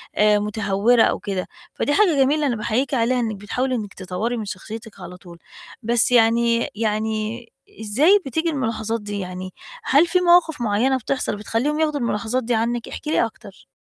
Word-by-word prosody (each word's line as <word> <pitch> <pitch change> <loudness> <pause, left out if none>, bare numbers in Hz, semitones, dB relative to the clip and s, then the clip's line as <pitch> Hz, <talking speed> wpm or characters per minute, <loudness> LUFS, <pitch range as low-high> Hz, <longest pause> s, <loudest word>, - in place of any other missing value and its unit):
آآ، 210 0 +4
متهوّرة 210 +2 +2
أو - - -1
كده. 190 -2 -4 0.3
فدي 290 - -1
حاجة 370 -3 +4
جميلة 295 +2 +1
أنا 245 - 0
باحييكِ 235 +5 -1
عليها 250 0 +1
إنِّك 225 -3 -2
بتحاولي 250 +6 -2
إنِّك 210 -4 -5
تطوّري 195 +6 -3
من 215 - -4
شخصيتِك 220 +3 -8
على 180 +1 -9
طول. 170 -1 -14 0.4
بس 235 +2 +2
يعني 235 0 +3
يعني 220 +1 -2 0.3
إزاي 290 - +4
بتيجي 320 +6 -1
الملاحظات 230 -6 -2
دي؟ 205 0 -5
يعني، 185 0 -6 0.3
هل 300 -1 +4
في 365 +1 +2
مواقف 345 -5 +4
معيّنة 235 +4 +1
بتحصل 260 -2 -2
بتخلّيهم 230 +9 -2
ياخدوا 300 -2 0
الملاحظات 235 +1 -1
دي 240 +2 -1
عنِّك؟ 235 +1 -1
احكِ - - -8
لي 305 - +2
أكتر. 215 -3 -12
230 Hz, 170 wpm, -21 LUFS, 210-260 Hz, 0.4 s, آآ